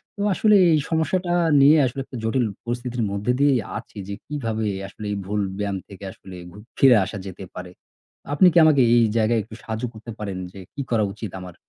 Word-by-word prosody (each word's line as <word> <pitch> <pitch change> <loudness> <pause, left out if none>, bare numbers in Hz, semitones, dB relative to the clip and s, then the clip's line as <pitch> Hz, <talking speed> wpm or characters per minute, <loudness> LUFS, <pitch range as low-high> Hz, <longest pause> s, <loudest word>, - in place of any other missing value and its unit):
তো - - -17
আসলে 210 +3 +4 0.2
এই 155 - +4
সমস্যাটা 175 +2 0 0.3
নিয়ে 150 +3 +7
আসলে 135 +2 -3
একটা 125 - -9
জটিল 120 +2 +1 0.2
পরিস্থিতির 120 0 -3
মধ্যে 100 +5 -1
দিয়েই 140 -3 +4 0.2
আছি - - -11
যে 100 - -5
কিভাবে 115 -7 -3 0.2
আসলে 105 +2 -10
এই 100 - -2
ভুল 105 +2 -1 0.2
ব্যায়াম 100 -1 -2
থেকে 100 -1 -12
আসলে 95 0 -12 0.2
গ - - -17 0.2
ফিরে 130 -3 +7
আসা 105 +1 -6
যেতে 95 0 -8
পারে। 90 -1 -8 0.6
আপনি 180 +6 +6
কি - - +2
আমাকে 145 -4 +5
এই 120 - +5
জায়গায় 115 +1 +2
একটু 110 +1 -12
সাহায্য 110 +1 -5
করতে 110 +2 -10
পারেন 100 -3 -4
যে 95 - -11
কি 140 - -5
করা 110 -2 +2
উচিত 110 -6 -7
আমার? 90 -1 -10
115 Hz, 200 wpm, -23 LUFS, 100-140 Hz, 0.6 s, নিয়ে